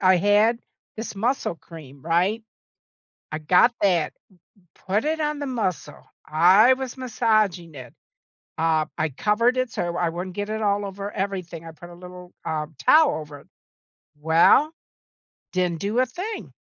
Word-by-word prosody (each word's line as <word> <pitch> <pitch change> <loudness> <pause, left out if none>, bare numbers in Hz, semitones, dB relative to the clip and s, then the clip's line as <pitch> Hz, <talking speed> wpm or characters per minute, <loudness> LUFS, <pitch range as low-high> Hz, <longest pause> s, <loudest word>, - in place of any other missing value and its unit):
I 185 -1 +5
had 205 +5 +3 0.4
this 220 -1 -6
muscle 235 -1 -1
cream, 150 -5 -14
right? 180 +7 +1 0.9
I 155 - -2
got 180 +10 +4
that, 175 -6 +1 0.7
put 210 +8 0
it 315 0 -1
on 300 -1 -2
the 285 - -3
muscle. 190 - -4 0.2
I 185 +11 +5
was 260 -1 -6
massaging 215 - 0
it. 125 -3 -11 0.7
Um, 160 -1 +1
I 155 -1 0
covered 215 - +1
it 255 -2 -1
so 175 -3 -3
I 175 - 0
I - - +1
wouldn't 180 +2 -6
get 205 +1 -3
it 220 0 -3
all 205 0 0
over 195 +1 -6
everything, 185 -5 -5
I 165 - -9
put 175 +2 -13
a - - -12
little, 180 0 -12
uh, 155 -1 -2 0.2
towel 310 - +5
over 150 -2 -11
it. - - -22 0.7
Well, 165 - +4 0.8
didn't 180 -3 -1
do 210 +5 -1
a 255 - +4
thing. 370 - -7
190 Hz, 160 wpm, -23 LUFS, 165-230 Hz, 0.9 s, I